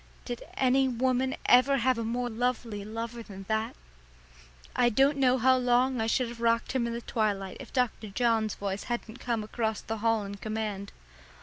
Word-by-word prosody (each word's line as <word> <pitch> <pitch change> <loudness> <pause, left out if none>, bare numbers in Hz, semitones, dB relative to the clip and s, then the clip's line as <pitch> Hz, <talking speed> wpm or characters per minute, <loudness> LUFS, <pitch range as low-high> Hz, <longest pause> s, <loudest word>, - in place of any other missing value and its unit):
Did 240 -2 -5
any 265 +1 +3
woman 260 +1 +1
ever 265 +3 +6
have 255 -1 +2
a - - -1
more 240 +2 -1
lovely 235 -3 -2
lover 230 +2 -5
than 195 -3 -10
that? 220 +2 -1 1.0
I 240 - +4
don't 270 +5 +3
know 255 -1 +4
how 260 +1 +4
long 250 0 +2
I 220 - 0
should 245 +1 +1
have 235 0 -9
rocked 230 0 +2
him 255 -2 0
in 235 - -3
the 235 - -4
twilight 205 -5 -1
if - - -10
Dr. 250 -4 0
John's 220 0 +1
voice 200 0 -4
hadn't 240 0 -4
come 235 -4 -1
across 220 0 -2
the 225 - -4
hall 225 -1 +2
in 200 0 -7
command. 215 -2 -4
235 Hz, 185 wpm, -29 LUFS, 220-250 Hz, 1.0 s, ever